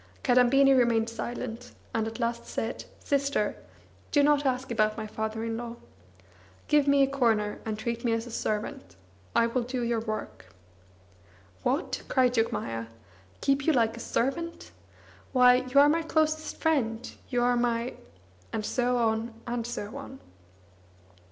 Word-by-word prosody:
Kadambini 270 +2 +5
remained 235 -2 +3
silent, 240 +1 -5 0.2
and 220 -1 0
at 225 +1 -7
last 235 0 -2
said: 225 +2 -4 0.2
"Sister, 280 0 0 0.6
do 290 -2 +4
not 290 -1 +3
ask 255 0 -1
about 215 -1 +1
my 220 - -4
father 220 +1 -4
in 225 0 -2
law. 235 0 -6 0.9
Give 295 -1 +3
me 280 0 +5
a - - +3
corner, 225 -6 +1
and 215 -1 -3
treat 235 +1 -3
me 235 - +1
as 225 0 -1
a 240 - -9
servant: 210 - -3 0.4
I 230 - +5
will 235 +2 0
do 245 +1 -3
your 235 -1 0
work." 215 - -6 1.1
"What?" 275 +7 -1
cried 255 -2 +3
Jogmaya. 115 - -1 0.5
"Keep 275 +1 +1
you 320 - +5
like 230 -3 +2
a - - -9
servant! 335 +9 -2 0.6
Why, 250 -1 +7
you 280 - +6
are 285 - +8
my 325 +3 +3
closest 315 -1 0
friend, 245 -8 0 0.2
you 245 -2 +1
are 245 0 +3
my 240 0 0 0.3
" 90 0 -30
and 215 - -3
so 250 +1 +1
on 225 0 0
and 240 -1 -3
so 220 -1 -5
on. 270 -1 -9
240 Hz, 155 wpm, -28 LUFS, 225-270 Hz, 1.1 s, are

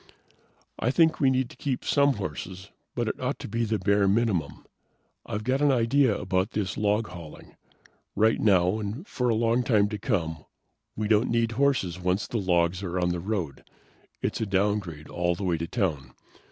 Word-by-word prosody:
"I 120 - +1
think 160 +3 +3
we 135 - +4
need 130 -1 +1
to - - -13
keep 140 -5 -3
some 140 -1 +3
horses, 95 - -6 0.2
but - - -1
it - - -3
ought - - -1
to - - -7
be 115 +2 -1
the 110 0 0
bare 100 -1 +2
minimum. 95 -8 0 0.6
I've 105 +1 -3
got 130 +4 0
an 145 -1 +4
idea 125 -1 +3
about 95 0 -1
this 100 -3 -2
log 105 0 0
hauling. 85 -3 -11 0.6
Right 110 +1 +3
now, 95 -1 +3
and 110 - -5
for 125 -1 -1
a 115 - +2
long 115 +2 +2
time 105 -5 +3
to 105 -1 -5
come, 85 - -2 0.5
we 105 0 -2
don't 110 +2 +3
need 115 -1 +1
horses 115 -9 +1
once 90 +2 0
the 115 - -2
logs 90 -1 +1
are 90 -2 -2
on 90 0 +1
the 90 0 -1
road. 90 -6 -3 0.6
It's - - -1
a 110 - -1
downgrade 95 -5 -1
all 85 0 0
the 100 - -6
way 85 -3 0
to 85 - -3
town. 80 - -2
105 Hz, 190 wpm, -27 LUFS, 90-115 Hz, 0.6 s, we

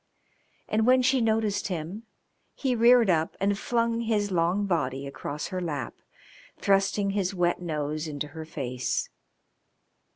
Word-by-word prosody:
And 220 +2 +1
when 255 0 +5
she 260 0 +3
noticed 220 -2 +1
him 185 +5 -5 0.5
he 260 -3 0
reared 235 0 +6
up 165 -3 +1
and 200 +1 +2
flung 230 +2 0
his 210 -3 0
long 180 +3 +1
body 140 -7 -1
across 145 +1 -5
her 185 -1 -3
lap, 145 -8 -3 0.6
thrusting 195 0 +2
his 195 -1 -1
wet 175 0 +1
nose 155 -2 -3
into 145 -1 -4
her 160 +2 -7
face. 130 -5 -3
190 Hz, 135 wpm, -27 LUFS, 155-220 Hz, 0.6 s, reared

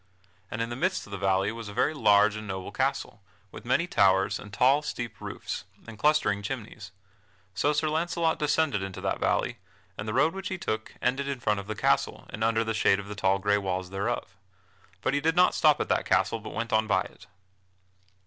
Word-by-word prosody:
And 115 +1 -2
in 115 - -4
the - - -3
midst 185 +8 -1
of 100 - -15
the 100 - -5
valley 95 +1 +1
was 115 -2 -7
a 100 - -9
very 125 - +2
large 105 -6 +4
and 110 0 -7
noble 95 -1 -5
castle, 105 - -2 0.3
with - - -11
many 130 +7 +2
towers, 95 - +3
and 105 - -11
tall, 130 +8 +4
steep 120 -6 -5
roofs, - - -5 0.2
and 115 -2 -11
clustering 125 -9 +2
chimneys. 100 - -6 0.6
So 145 +11 +1
Sir 150 +1 0
Launcelot 165 +1 0
descended 150 -7 +1
into 95 -1 -5
that - - -1
valley, - - 0 0.4
and 105 - -4
the 110 - -2
road 160 - +3
which 195 0 -5
he 190 - -3
took 110 -9 -4
ended 135 +3 0
in 140 -2 -3
front 105 -3 0
of 100 - -8
the 110 - -3
castle - - +1
and 110 - -4
under 115 0 +2
the 110 0 -2
shade 105 -2 +3
of 100 0 -8
the 105 - -5
tall 95 -2 +2
gray 105 +1 +2
walls 95 -1 -3
thereof. 95 -2 -3 0.7
But - - 0
he 145 - +1
did 165 +2 +1
not 180 +1 +5
stop 150 -2 +4
at - - -1
that - - +1
castle 115 - +2
but 110 - -9
went 115 0 -3
on 110 0 +3
by 95 -3 +3
it. 90 - -11
110 Hz, 215 wpm, -27 LUFS, 100-145 Hz, 0.7 s, not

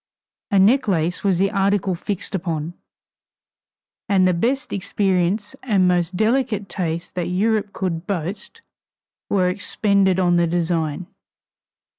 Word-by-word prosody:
A 200 - +2
necklace 190 - +2
was 195 -3 +2
the 195 +2 +1
article 195 -1 +1
fixed 200 +4 -4
upon, 165 -3 -3 1.4
and 190 -2 +4
the 180 - +3
best 255 +11 -1
experience 195 +2 0
and 200 -7 +2
most 180 0 +1
delicate 220 -2 +1
taste 170 -2 -4
that 180 -2 -2
Europe 210 +3 0
could 175 -4 -3
boast 195 - -4 0.7
were 185 -2 +2
expended 195 0 +1
on 175 -2 +3
the 170 0 +3
design. 165 -1 -1
190 Hz, 120 wpm, -21 LUFS, 175-205 Hz, 1.4 s, and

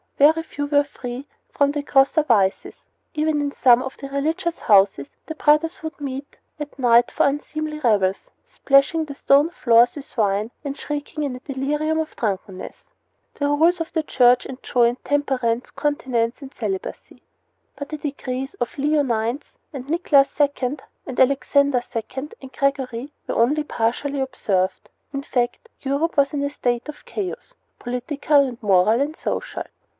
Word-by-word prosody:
Very 315 +3 +5
few 290 -3 -5
were 285 0 +3
free 260 -1 -7 0.2
from 285 0 +2
the 290 0 -2
grosser 275 +3 +4
vices. 200 -9 +1 0.4
Even 305 0 +1
in 285 -1 -1
some 250 -3 +5
of 265 - -7
the 275 - -7
religious 320 +5 -1
houses 195 -8 +3 0.2
the 315 - -6
brothers 305 +3 +2
would 315 -1 -7
meet 275 0 -6 0.2
at 295 -2 -7
night 240 -2 +4
for - - +2
unseemly 305 +2 -3
revels, 205 -8 +1
splashing 320 - +2
the 285 -2 -8
stone 280 +3 +4
floors 240 -7 +4
with 285 -2 -10
wine 210 +1 +1
and 280 -1 -4
shrieking 295 +1 -4
in 275 -3 -2
a - - -8
delirium 295 +4 -1
of 315 -1 -4
drunkenness. 195 -3 -4 0.5
The 285 - -1
rules 325 +5 +3
of 330 - -5
the 320 - 0
Church 250 -4 +4
enjoined 245 -2 0
temperance, 260 -5 0
continence, 255 -5 -1
and 275 -1 -10
celibacy; 195 -5 -5 0.5
but 285 - -7
the 305 - -4
decrees 270 -2 -4
of 245 - -4
Leo 295 +2 +2
IX. 235 +1 -1 0.3
and 265 -2 -7
Nicholas 290 -3 +3
II. 285 -1 +1 0.3
and 260 - -5
Alexander 275 0 +3
II. 225 - 0 0.4
and 265 -1 -10
Gregory 270 -1 -1 0.2
were - - -2
only 290 +7 +2
partially 275 +3 -1
observed. 195 -8 -1 0.2
In 275 0 -3
fact, 250 - -2
Europe 285 +4 -1
was 280 +1 +3
in 285 -1 -1
a 285 - 0
state 245 -2 -2
of 295 - -10
chaos 425 +5 -5 0.2
political 280 +4 +1
and 245 -1 -8
moral 205 +3 +4
and 300 +2 -1
social. - - -4
275 Hz, 160 wpm, -22 LUFS, 245-295 Hz, 0.5 s, Very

